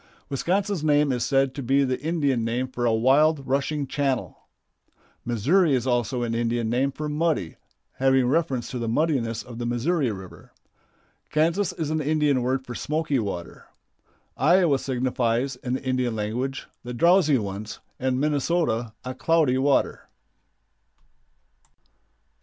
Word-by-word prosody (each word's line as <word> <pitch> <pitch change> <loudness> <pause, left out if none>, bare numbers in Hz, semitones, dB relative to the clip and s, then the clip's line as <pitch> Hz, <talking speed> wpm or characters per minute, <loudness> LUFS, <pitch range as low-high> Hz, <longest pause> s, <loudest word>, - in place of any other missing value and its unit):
Wisconsin's 185 - -1
name 145 -2 +3
is 125 -2 -1
said 135 -1 +2
to 140 - -5
be 135 +2 +2
the 130 -2 -1
Indian 145 -6 0
name 120 +3 -1
for 125 -1 -2
a - - +3
wild, 135 +6 +3
rushing 140 +2 -1
channel. 135 -2 -2 0.8
Missouri 140 - +2
is 125 -1 -1
also 120 -1 0
an 115 -1 -2
Indian 115 -1 -1
name 135 +3 +1
for 150 +2 -5
"muddy," 150 - -1 0.4
having 130 -1 +3
reference 135 -4 0
to 125 - -4
the 115 - -3
muddiness 115 -4 0
of 120 -1 -10
the 120 - -3
Missouri 130 +3 0
River. 95 -2 -11 0.8
Kansas 170 +5 +1
is 160 -4 -3
an 155 0 0
Indian 150 -3 +1
word 130 +2 -1
for 120 - -7
"smoky 150 0 -1
water." 100 -6 -6 0.7
Iowa 165 -2 +3
signifies, 125 -1 -1
in 125 0 -4
the 130 - -3
Indian 130 -3 0
language, 120 +6 -3 0.2
"the 120 0 -6
drowsy 170 0 +4
ones," 105 0 -5 0.2
and 130 0 0
Minnesota, 145 -6 0
"a 130 - -4
cloudy 140 -1 +2
water." 140 +1 +1
130 Hz, 140 wpm, -25 LUFS, 120-150 Hz, 0.8 s, drowsy